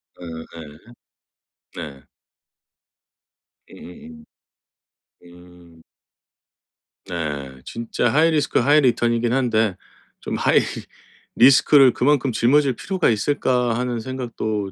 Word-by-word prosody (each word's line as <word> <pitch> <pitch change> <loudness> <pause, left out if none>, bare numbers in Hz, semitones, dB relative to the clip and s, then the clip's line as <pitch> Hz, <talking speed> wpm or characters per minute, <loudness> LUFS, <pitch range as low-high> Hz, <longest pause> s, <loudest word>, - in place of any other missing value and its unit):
어 80 -2 -9
예. 75 -2 -11 1.0
네. 70 -4 -10 1.7
음음음. 80 -3 -13 1.0
음. 85 -1 -18 1.2
네. 70 -6 -6
진짜 115 +1 -2
하이리스크 155 -1 +2
하이리턴이긴 120 -4 +2
한데 115 -6 0 0.4
좀 - - -5
'하이리스크를 135 0 +2
그만큼 135 -1 +1
짊어질 130 +4 +2
필요가 190 - -1
있을까?' 125 0 0
하는 125 -1 -3
생각도 110 -5 -5
115 Hz, 190 characters per minute, -21 LUFS, 85-130 Hz, 1.7 s, 하이리스크